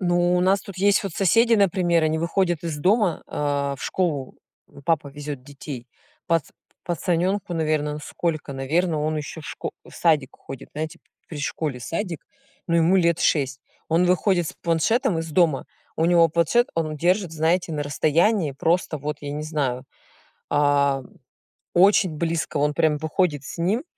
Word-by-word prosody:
Ну, 175 -1 +2
у - - +2
нас 190 +2 +3
тут 195 -2 -10
есть 200 +1 +3
вот 195 - -3
соседи, 230 +6 +4
например, 175 -4 +2
они 155 0 +1
выходят 175 0 0
из 155 -3 -3
дома, 190 +1 +2
а, 140 -1 -1
в - - -11
школу, 155 -8 -2 0.5
папа 160 -4 +1
везёт 145 -2 -7
детей, 135 -3 -8 0.4
пат 165 -2 +2 0.4
пацанёнку, 175 +3 -1
наверно, 155 -2 0
ну 150 - -5
сколько, 155 -4 -3
наверно, 155 +5 0
он 155 0 -1
ещё 150 +2 -6
в - - -10
шко - - -5
в - - -15
садик 155 -6 +2
ходит, 135 - -10
знаете, 155 +1 -4 0.3
при 155 - -7
школе 145 -2 -3
садик, 165 - -4 0.4
но 170 -1 +2
ему 170 +3 +4
лет 170 -2 +2
6, 135 -3 +1 0.3
он 165 +3 +3
выходит 180 -1 +2
с - - -8
планшетом 175 - +1
из 165 -1 -4
дома, 160 -5 +2 0.3
у 160 - +2
него 170 -1 +5
планшет, 170 +10 +2
он 155 -2 -2
держит, 180 +2 +1
знаете, 165 +3 +1
на 150 -1 -2
расстоянии 160 +3 +2
просто, 165 +2 0
вот, 150 +1 -4
я 145 -1 -5
не 150 +1 -4
знаю, 140 -5 -2 0.7
а, 140 -2 +2 0.7
очень 190 0 +5
близко, 165 -1 -2
он 150 +1 +2
прям 155 -3 +2
выходит 160 -2 0
с 155 - -8
ним. 205 - 0
165 Hz, 165 wpm, -23 LUFS, 150-180 Hz, 0.7 s, него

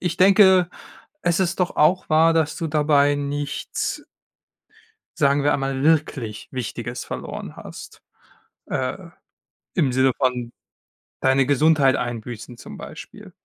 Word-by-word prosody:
ich 175 -2 -2
denke, 190 -2 +6 0.5
es 175 +1 +1
ist 185 0 -1
doch 180 - -1
auch 175 +5 +3
wahr, 160 +1 +4
dass 155 -2 +1
du 165 - -3
dabei 145 -1 +3
nichts 145 +1 -4 1.1
sagen 140 0 +3
wir 145 - +2
einmal, 135 -1 -1
wirklich 145 -8 0
Wichtiges 120 -1 -5
verloren - - -7
hast. - - -11 0.6
Äh, - - -3 0.7
im 135 - +1
Sinne 130 +1 +3
von 125 -3 -1 0.7
deine 130 0 +3
Gesundheit 145 0 +3
einbüßen 120 -1 -5
zum - - -10
Beispiel. - - -11
145 Hz, 120 wpm, -22 LUFS, 130-160 Hz, 1.1 s, denke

